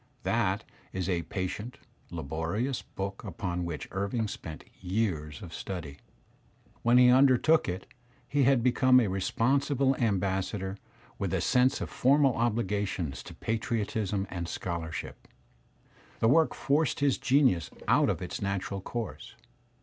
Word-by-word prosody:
That - - +1 0.3
is 95 -1 -2
a 90 -3 +1
patient, 95 +7 -4 0.3
labori 80 - -2
ous 135 -2 -2
book 100 0 -6
upon 90 -3 -3
which 85 -3 -5
Irving 100 +4 -1
spent 80 -5 -7 0.2
years 90 -6 -2
of 85 -2 -9
study. 80 -7 -6 0.8
When 120 +1 +4
he 125 0 +7
undertook 135 - +5
it 90 +2 -4 0.4
he 145 - +1
had 130 -2 +4
become 130 +1 +5
a 115 - +2
responsible 135 +8 +1
ambassador 95 -2 -1 0.4
with - - -1
af* - - 0
sense 130 +3 +3
of - - -3
the - - -14
formal 135 0 +4
obligations 105 - -1
of - - -13
patriotism 110 -3 -1
and 85 -2 -4
scholarship. 85 -3 -5 0.5
( - - -29
The 115 - +3
work 160 +4 +4
forced 145 -1 +1
his 140 -3 +2
genius 130 - +3 0.2
out - - +4
of 90 - -1
its 90 - -5
natural 100 0 -2
course. 115 +1 -6
100 Hz, 140 wpm, -29 LUFS, 90-125 Hz, 0.8 s, he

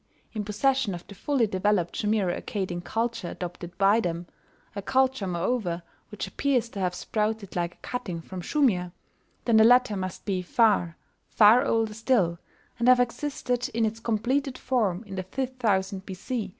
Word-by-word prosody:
in 215 -2 -2
possession 220 +1 +1
of 175 - -10
the - - -11
fully 255 +4 +1
developed 190 -3 0
Shumiro 210 -4 +1
Accadian 185 -4 -4
culture 225 -2 -2
adopted 175 -1 -7
by 200 +3 +4
them 175 -4 -2 0.5
a 200 - -3
culture, 260 -1 +1
moreover, 175 -1 -1 0.3
which 210 - -5
appears 255 -4 0
to 205 - -7
have 180 -1 0
sprouted 215 -2 -2
like 175 0 -2
a - - -37
cutting 230 -9 -4
from 180 +2 -7
Shumir, 180 - +1 0.5
then 230 -2 +4
the 220 - +7
latter 245 -1 +5
must 185 -1 -5
be 190 -3 -1
far, 180 -4 +2 0.3
far 220 +3 +6
older 225 -1 +1
still, 210 -7 +1 0.4
and 235 - +1
have 255 0 +7
existed 250 0 -1
in 230 -1 +2
its 220 +1 -3
completed 250 +5 -1
form 215 -7 0
in 200 -3 -10
the 190 - -2
fifth 260 +6 -4
thousand 190 -4 0
B.C. 200 +3 -4
210 Hz, 165 wpm, -27 LUFS, 185-245 Hz, 0.5 s, the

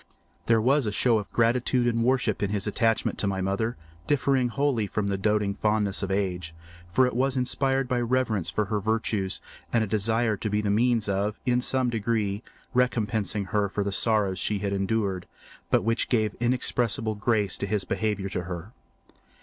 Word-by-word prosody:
There 115 -1 +4
was 130 +2 +2
a - - 0
show 115 +1 +2
of 105 - -8
gratitude 120 +2 +2
and 115 -1 +1
worship 125 -4 +1
in 100 - 0
his 100 -1 -1
attachment 115 +1 0
to 100 - 0
my 95 -1 -1
mother, 100 +5 -1 0.3
differing 135 -3 +2
wholly 125 -3 0
from 105 +1 -2
the 100 0 0
doting 105 0 +1
fondness 105 -1 0
of 95 - -2
age, 90 -4 -2 0.3
for 105 +9 +3
it 125 - -2
was 135 +1 +1
inspired 135 +1 +1
by 125 -1 0
reverence 120 -6 0
for 105 - 0
her 105 +1 -1
virtues 105 -2 -1 0.3
and 115 - +2
a - - 0
desire 110 +2 +1
to 110 - -3
be 105 +1 +1
the 105 -1 0
means 115 0 +2
of, 100 +2 -1
in 125 -1 +2
some 130 -1 +1
degree, 110 -2 -1 0.3
recompensing 110 -5 0
her 105 -1 +2
for 100 +1 -2
the 100 - -2
sorrows 100 -3 +2
she 105 - 0
had 100 0 -2
endured, 95 -2 -1 0.4
but - - +3
which 115 +1 0
gave 110 -4 +1
inexpressible 120 -2 +1
grace 105 -2 0
to 100 - -2
his 105 -1 0
behaviour 100 -1 -1
to 90 -2 -3
her. 90 +3 -6
110 Hz, 185 wpm, -26 LUFS, 100-120 Hz, 0.4 s, There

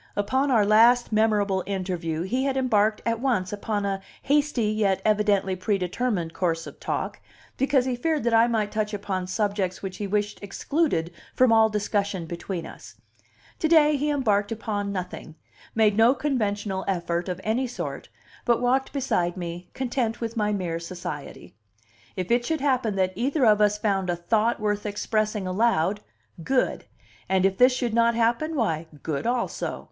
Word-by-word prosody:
Upon 260 +8 +1
our 225 -6 +4
last 230 +4 +5
memorable 210 -3 +2
interview 180 -4 -2
he 255 +8 -1
had 270 -1 0
embarked 215 -5 +2
at 230 -1 0
once 225 -8 0
upon 205 0 -2
a 195 -1 -2 0.2
hasty 290 -3 +1
yet 205 -3 +1
evidently 205 -3 +2
predetermined 185 -1 -1
course 165 -2 -1
of - - -11
talk, - - -3 0.3
because 270 -1 +2
he 255 -1 -1
feared 310 +3 -1
that 235 0 +1
I 225 +1 +6
might 215 -3 0
touch 215 -1 -1
upon 190 -2 -3
subjects 200 -2 -1
which 190 -1 -5
he 205 - -3
wished 205 +1 -1
excluded 200 - -1 0.2
from 255 -2 +5
all 220 0 +5
discussion 205 -3 -1
between 170 +1 -5
us; - - -12 0.6
to 320 - +1
day 305 -2 +5
he 290 +2 0
embarked 215 -8 +1
upon 205 -2 -3
nothing, 180 -4 -6 0.4
made 215 -2 +4
no 230 +4 +5
conventional 205 -9 -1
effort 175 -1 -1
of 180 0 -3
any 240 +4 0
sort, 245 - -6 0.3
but 235 -2 +2
walked 255 +2 +1
beside 190 -11 0
me, 175 0 -6
content 245 -3 -1
with 230 0 -4
my 210 -2 +1
mere 175 -5 -2
society; 160 - -7 0.6
if 185 +2 -3
it 240 +1 +3
should 320 +5 -1
happen 255 -7 +1
that 185 -1 +1
either 265 - +1
of 210 -1 +5
us 210 0 +3
found 195 -3 0
a 175 - +1
thought 215 +7 +1
worth 210 0 -1
expressing 215 0 -1
aloud, 195 -1 +1 0.4
good! 265 +7 0 0.4
and 190 0 +3
if 195 0 +1
this 250 +1 +7
should 245 -2 -2
not 235 0 +3
happen, 235 +8 +1
why, 165 - -1 0.2
good 155 +6 -2
also! 245 0 -2
210 Hz, 165 wpm, -25 LUFS, 190-240 Hz, 0.6 s, this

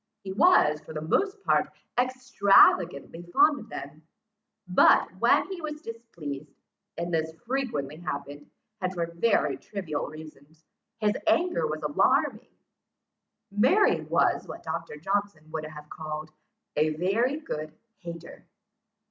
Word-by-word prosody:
He 190 - -5
was 190 - +4
for - - -11
the 155 - -3
most 390 - 0
part - - +2 0.3
extravagantly 200 - +3
fond 290 - +5
of 225 - -12
them; 145 -3 -8 0.7
but, 180 - +5
when - - +4
he 370 -3 -5
was 300 -1 -5
displeased, 165 - -8 0.4
and 170 0 -3
this 160 0 -1
frequently 225 - -2
happened, 145 -3 -6 0.3
and 185 0 0
for 175 -2 -2
very 205 +6 +2
trivial 180 -8 -4
reasons, 155 0 -13 0.3
his 210 -1 +1
anger 325 - +2
was 155 0 -4
alarming. 150 -1 +1 1.0
Mary 260 - +4
was - - +1
what - - -8
Dr. - - -5
Johnson 195 -2 -2
would 155 -1 -4
have 150 -1 -10
called, 155 0 -6 0.4
"a 155 +1 +2
very 225 - +1
good 155 - -5 0.3
hater." 170 -2 -10
170 Hz, 125 wpm, -27 LUFS, 155-230 Hz, 1.0 s, fond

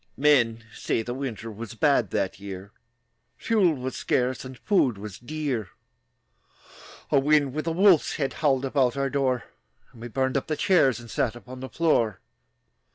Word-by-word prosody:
Men 120 -6 +3
say 115 - -1
the 120 - -4
winter 120 -4 -5
Was 115 +2 -8
bad 120 -3 +2
that 100 -2 -2
year; 100 0 -8 0.7
Fuel 195 -8 +2
was 130 0 -5
scarce, 125 0 0
And 130 -1 -9
food 130 - +1
was 100 -1 -8
dear. 130 - -3 1.4
A 140 - +5
wind 145 -1 +3
with 155 +2 -3
a - - +1
wolf's 180 -1 +4
head 135 -3 -2
Howled 135 -3 +2
about 130 -1 +1
our 135 -1 -1
door, 130 -4 0 0.5
And 115 - -16
we 120 - -5
burned 130 +2 0
up 135 - -3
the 155 -1 -2
chairs 155 - +3
And 120 -2 -11
sat 120 -2 0
upon 125 +2 -10
the 130 0 -7
floor. 115 - +1
130 Hz, 165 wpm, -26 LUFS, 115-145 Hz, 1.4 s, A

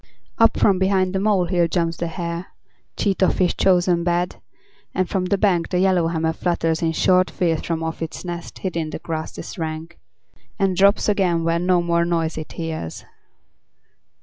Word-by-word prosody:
Up 225 - +5
from 195 -3 +3
behind 190 -1 +2
the 190 - 0
molehill 180 -4 +2
jumps 170 -1 -1
the 170 - -2
hare, 170 +1 -4 0.5
Cheat 195 -2 0
of 185 - +3
his 180 -2 +2
chosen 180 -2 +2
bed, 175 +1 0 0.6
and 185 -1 +1
from 190 -2 -1
the 195 +2 +1
bank 180 -5 +1
The 180 - 0
yellowhammer 170 -3 +2
flutters 165 -1 -1
in 165 -1 +1
short 185 +2 +3
fears 165 -3 0
From 165 -1 -3
off 160 0 -4
its 160 +2 -5
nest 175 -1 -6
hid 185 -3 -4
in 160 -2 -2
the - - -5
grasses 160 +2 -6
rank, 160 +1 -5 0.6
And 195 -2 +1
drops 200 +2 +4
again 185 -5 +1
when 170 +2 0
no 180 -2 +3
more 170 0 +2
noise 165 -2 -1
it 155 - -8
hears. 160 - -5
175 Hz, 175 wpm, -22 LUFS, 165-185 Hz, 0.6 s, Up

